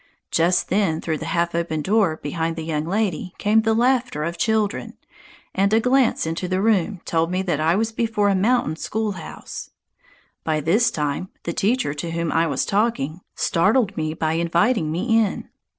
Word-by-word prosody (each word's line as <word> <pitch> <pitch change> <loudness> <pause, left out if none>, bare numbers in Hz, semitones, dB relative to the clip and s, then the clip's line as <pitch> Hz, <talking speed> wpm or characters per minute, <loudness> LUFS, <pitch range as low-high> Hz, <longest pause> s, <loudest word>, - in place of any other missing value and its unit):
Just 170 +2 +2
then, 185 -5 +1
through 160 -2 -2
the - - -5
half 170 0 0
open 165 -2 -1
door 195 -5 +2
behind 165 +3 -2
the 165 - -5
young 155 -1 -2
lady, 185 -2 -2
came 215 +2 +3
the 220 0 +1
laughter 245 - +1
of 170 +2 -3
children, 220 +2 -1 0.6
and 195 +1 +2
a 220 - +5
glance 250 -2 +2
into 165 +3 -3
the 185 +1 0
room 200 -3 +1
told 165 0 +1
me 185 +1 -1
that 175 -6 -1
I 160 +2 +2
was 225 +2 0
before 220 -2 0
a 200 - +3
mountain 195 -4 +1
schoolhouse. 205 -3 -5 0.7
By 155 -1 0
this 190 +11 +3
time 150 +4 -2
the 170 - -3
teacher, 210 - +1
to 150 +3 -5
whom 170 -1 -2
I 165 +1 +2
was 140 -3 -1
talking, 195 -7 0
startled 205 +4 +2
me 155 0 -2
by 160 0 0
inviting 170 +2 +1
me 225 +8 +2
in. 205 - -4
180 Hz, 180 wpm, -22 LUFS, 160-220 Hz, 0.7 s, a